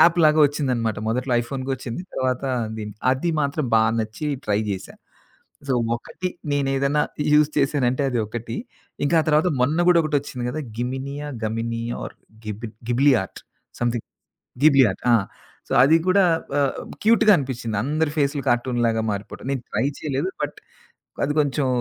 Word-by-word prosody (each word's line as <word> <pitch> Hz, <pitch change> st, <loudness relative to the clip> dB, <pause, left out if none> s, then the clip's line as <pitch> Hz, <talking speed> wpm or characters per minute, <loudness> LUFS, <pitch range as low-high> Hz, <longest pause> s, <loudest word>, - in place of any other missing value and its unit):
యాప్‌లాగా 160 Hz, -3 st, +5 dB
ఒచ్చిందనమాట. 125 Hz, -7 st, -1 dB
మొదట్లో 125 Hz, +2 st, -1 dB
ఐఫోన్‌కోచ్చింది. 130 Hz, +3 st, -4 dB
తర్వాత 130 Hz, 0 st, -1 dB, 0.3 s
దీ 110 Hz, -, -4 dB, 0.3 s
అది 150 Hz, +6 st, -1 dB
మాత్రం 145 Hz, +1 st, -1 dB
బా 110 Hz, -, +6 dB, 0.2 s
నచ్చి 110 Hz, +8 st, -4 dB, 0.2 s
ట్రై 105 Hz, 0 st, +2 dB
జేశా. 95 Hz, -1 st, -5 dB, 0.7 s
సో 130 Hz, -, +1 dB, 0.2 s
ఒకటి 180 Hz, +9 st, -5 dB, 0.2 s
నేను 140 Hz, -1 st, +1 dB
ఏదైనా 140 Hz, +2 st, +2 dB, 0.3 s
యూజ్ 150 Hz, 0 st, +5 dB
చేశానంటే 135 Hz, -1 st, +1 dB
అది 120 Hz, -, 0 dB
ఒకటి. 115 Hz, +1 st, -5 dB, 0.5 s
ఇంకా 165 Hz, -, +2 dB
ఆ -, -, -3 dB
తర్వాత 155 Hz, +3 st, +4 dB
మొన్న 150 Hz, +6 st, +2 dB
కూడా 170 Hz, -1 st, +6 dB
ఒకటొచ్చింది 145 Hz, -5 st, -2 dB
గదా! 155 Hz, +4 st, -3 dB, 0.2 s
గిమినియా? 135 Hz, +4 st, -4 dB, 0.2 s
గమినియా 115 Hz, +1 st, -3 dB
are -, -, -9 dB, 0.3 s
గిబి 110 Hz, +2 st, -5 dB, 0.2 s
Ghibli 135 Hz, +3 st, +4 dB
art. 95 Hz, -, -11 dB, 0.4 s
Something. 120 Hz, -1 st, -1 dB, 0.6 s
Ghibli 135 Hz, -4 st, +7 dB
ఆట్. -, -, -14 dB
ఆ! -, -, +7 dB, 0.5 s
సో -, -, -4 dB
అది 155 Hz, +5 st, +6 dB
కూడా 195 Hz, +1 st, +5 dB, 0.3 s
ఆహ్, 140 Hz, -2 st, +1 dB, 0.3 s
క్యూట్‌గా 220 Hz, -1 st, +6 dB
అనిపించింది. 120 Hz, -5 st, -3 dB
అందరి 150 Hz, +3 st, 0 dB
ఫేస్లు 140 Hz, 0 st, +1 dB
కార్టూన్‌లాగా 120 Hz, -2 st, +1 dB
మారిపోవటం. 100 Hz, +5 st, -7 dB
నేను 130 Hz, -3 st, -2 dB
ట్రై -, -, +1 dB
చేయలేదు. 150 Hz, +4 st, -1 dB
బట్ 145 Hz, 0 st, -4 dB, 0.7 s
అది 145 Hz, -, -1 dB
కొంచెం 145 Hz, -1 st, 0 dB
135 Hz, 145 wpm, -23 LUFS, 120-150 Hz, 0.7 s, Ghibli